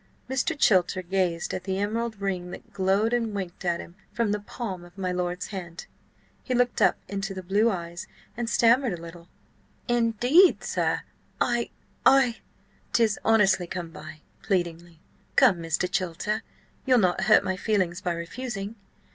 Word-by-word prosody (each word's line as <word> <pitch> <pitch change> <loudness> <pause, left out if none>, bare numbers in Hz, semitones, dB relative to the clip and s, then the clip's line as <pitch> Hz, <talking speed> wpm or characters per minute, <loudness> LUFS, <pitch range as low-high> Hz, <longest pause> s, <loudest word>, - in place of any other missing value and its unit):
Mr. 275 +4 -1
Chilter 185 -6 +3
gazed 175 -2 -1
at 185 - -4
the 190 -1 -1
emerald 220 +2 -2
ring 185 -3 -2
that - - -11
glowed 200 +4 +2
and 230 -3 0
winked 185 -3 -5
at 175 -1 0
him 170 - -9 0.2
from 230 -3 0
the 210 - 0
palm 200 -3 -6
of 175 +2 -16
my 185 -2 -2
lord's 180 0 -2
hand. 175 -4 -7 0.6
He 255 - -1
looked 245 0 +1
up - - +5
into 195 0 -4
the 185 - -6
blue 205 +5 +3
eyes 175 -3 -5 0.3
and 235 -1 -3
stammered 235 -4 +3
a - - -13
little. 170 0 -11 0.6
"Indeed, 240 - +4
sir–I–I—" 240 +1 0 0.6
"'Tis 225 -3 +3
honestly 200 -5 +3
come 170 -1 -5
by!" 155 0 -10 0.2
pleadingly. 170 -3 -2 0.4
"Come, 185 - +6
Mr. 165 +2 -1
Chilter, 190 +3 -2 0.4
you'll 255 -2 +4
not 190 -3 +2
hurt 215 +1 +6
my 190 - -1
feelings 185 -3 0
by 175 -1 -1
refusing? 205 +4 -5
195 Hz, 150 wpm, -26 LUFS, 175-230 Hz, 0.6 s, Come